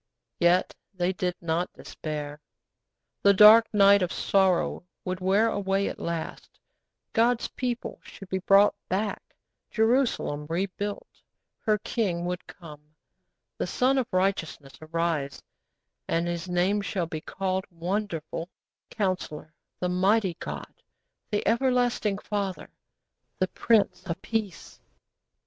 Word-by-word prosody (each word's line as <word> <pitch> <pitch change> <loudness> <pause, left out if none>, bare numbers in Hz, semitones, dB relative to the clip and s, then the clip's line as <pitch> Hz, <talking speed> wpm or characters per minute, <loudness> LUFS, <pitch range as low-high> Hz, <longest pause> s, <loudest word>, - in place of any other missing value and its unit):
Yet 175 +1 +3 0.2
they 180 +1 0
did 180 -1 -2
not 170 +1 -1
despair. 150 -1 -6 0.8
The 200 0 +5
dark 215 +3 +8
night 200 -1 +6
of 180 -1 0
sorrow 190 -2 +1 0.2
would 185 0 -3
wear 195 +4 +3
away 200 -2 0
at - - -8
last, 170 -1 -5 0.5
God's 235 +1 +2
people 245 -1 -4
should 195 - -12
be 190 0 -2
brought 195 +2 +5 0.2
back, 200 +3 -1 0.5
Jerusalem 225 - +1
rebuilt; 195 +4 -3 0.5
her 215 -1 +1
King 190 -6 -2
would 180 0 -4
come, 150 -4 -12 0.8
the - - -1
Sun 265 +2 +2
of 250 - -1
Righteousness 185 -7 -1
arise, 155 -3 -2 0.7
'_And 165 +1 +1
His 175 +1 -3
name 185 +4 +2
shall 185 -2 -2
be 160 -1 -6
called 190 +1 -2
Wonderful, 175 -2 -3 0.4
Counsellor, 185 -7 -3 0.3
The 180 - -1
Mighty 190 +1 +2
God, - - -6 0.6
The 210 -2 -1
Everlasting 245 -3 +2
Father, 200 -2 -4 0.7
The 185 - 0
Prince 225 -3 +2
of 165 - -3
Peace. 215 -5 -4
190 Hz, 120 wpm, -27 LUFS, 170-210 Hz, 0.8 s, dark